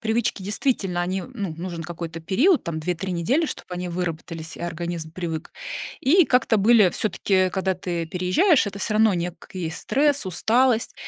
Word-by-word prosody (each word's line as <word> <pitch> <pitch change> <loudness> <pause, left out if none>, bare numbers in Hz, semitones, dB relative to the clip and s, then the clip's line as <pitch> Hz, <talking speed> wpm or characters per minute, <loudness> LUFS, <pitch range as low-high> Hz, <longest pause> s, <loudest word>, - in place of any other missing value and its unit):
привычки 220 -2 0
действительно, 195 -4 0
они, 185 +1 -2
ну, 200 -10 -5
нужен 170 -1 -5
какой-то 165 -1 -6
период, 265 - +3
там 160 -2 -3
2-3 180 +3 -2
недели, 255 - +1
чтоб - - -6
они 180 0 -4
выработались, 165 -2 -4
и - - -11
организм 170 -1 -4
привык. 165 -2 -5 0.5
И 330 +7 +5
как-то 250 -4 +3
были 210 -2 +5
всё-таки, 185 -2 +1
когда 190 0 0
ты 170 -2 -3
переезжаешь, 195 - +3
это 200 0 -5
всё 215 - -1
равно 220 -2 +4
некий 175 0 -4
стресс, 280 - +1
усталость. 230 +6 +2
185 Hz, 155 wpm, -24 LUFS, 170-220 Hz, 0.5 s, И